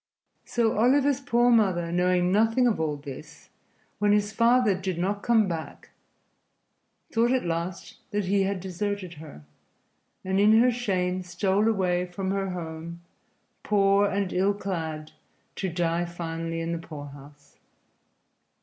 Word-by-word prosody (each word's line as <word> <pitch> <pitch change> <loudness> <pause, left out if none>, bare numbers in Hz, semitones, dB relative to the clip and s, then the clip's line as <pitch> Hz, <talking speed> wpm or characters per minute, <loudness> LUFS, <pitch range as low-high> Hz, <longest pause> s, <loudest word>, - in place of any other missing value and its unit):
So 225 -3 0
Oliver's 275 +3 +3
poor 245 -3 +3
mother, 185 -7 +2
knowing 180 0 +2
nothing 225 +5 +3
of 235 -7 +1
all 155 -2 -1
this, 140 -2 -11 0.5
when 205 0 +3
his 210 0 +1
father 235 -1 +4
did 185 -1 -3
not 200 +4 -1
come 225 -3 +3
back, 165 -3 -6 1.2
thought 235 +1 +2
at 260 -5 +1
last 170 +2 -4
that 205 -1 -1
he 195 +2 +2
had 195 0 -1
deserted 190 0 -4
her, 145 - -12 0.8
and 190 +1 0
in 215 +2 +6
her 250 +2 +5
shame 185 -6 -1
stole 190 +4 0
away 180 -4 +1
from 190 +2 -4
her 195 -1 -1
home, 170 -1 -7 0.6
poor 200 0 +3
and 200 -1 -2
ill 195 +2 +2
clad, 160 -6 -4 0.5
to 190 - -2
die 170 0 0
finally 165 -1 -4
in 165 0 -3
the 170 - -2
poorhouse. 145 -2 -12
190 Hz, 140 wpm, -26 LUFS, 170-210 Hz, 1.2 s, in